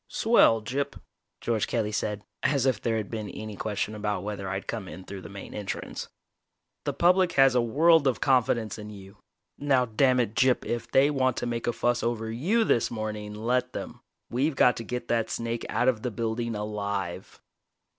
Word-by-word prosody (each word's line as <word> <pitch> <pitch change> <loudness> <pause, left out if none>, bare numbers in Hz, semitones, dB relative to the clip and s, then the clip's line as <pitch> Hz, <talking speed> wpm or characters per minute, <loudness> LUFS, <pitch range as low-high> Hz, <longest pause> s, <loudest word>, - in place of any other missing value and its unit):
"Swell, 220 - +4
Gyp," 140 +5 -3 0.4
George 115 -3 0
Kelly 110 -3 -1
said, 105 -1 -2 0.2
as 140 -2 +2
if 130 -6 +1
there 115 -1 0
had 105 -2 -4
been 110 -2 -4
any 110 -1 -7
question 105 +1 -2
about 105 -3 -2
whether 100 -2 -4
I'd 95 +1 -3
come 110 -5 -4
in 95 +3 -9
through 95 0 -8
the - - -10
main 100 -1 -9
entrance. 105 -2 -5 0.8
"The - - -1
public 180 0 +3
has 135 -1 +6
a 125 - +3
world 150 +6 +4
of 130 - +1
confidence 120 -5 +1
in 105 0 -8
you. 100 -1 -12 0.4
Now, 135 -3 +3
damn 125 +3 +3
it, 115 -3 0
Gyp, 130 +1 +2
if 120 -1 -3
they 140 +2 +4
want 130 -3 +1
to - - -2
make 120 -1 -3
a - - +3
fuss 120 +1 0
over 110 -1 -2
you 185 - +1
this 120 - +2
morning, 105 -2 -5
let 125 +3 0
them. - - -6 0.3
We've 135 +5 +1
got 125 -3 +5
to 115 - -4
get 125 +2 -5
that 115 -1 +1
snake 115 0 -3
out 125 - +1
of 120 -4 +2
the 125 - -2
building 115 +1 -2
alive!" 100 -3 -4
115 Hz, 195 wpm, -27 LUFS, 105-130 Hz, 0.8 s, has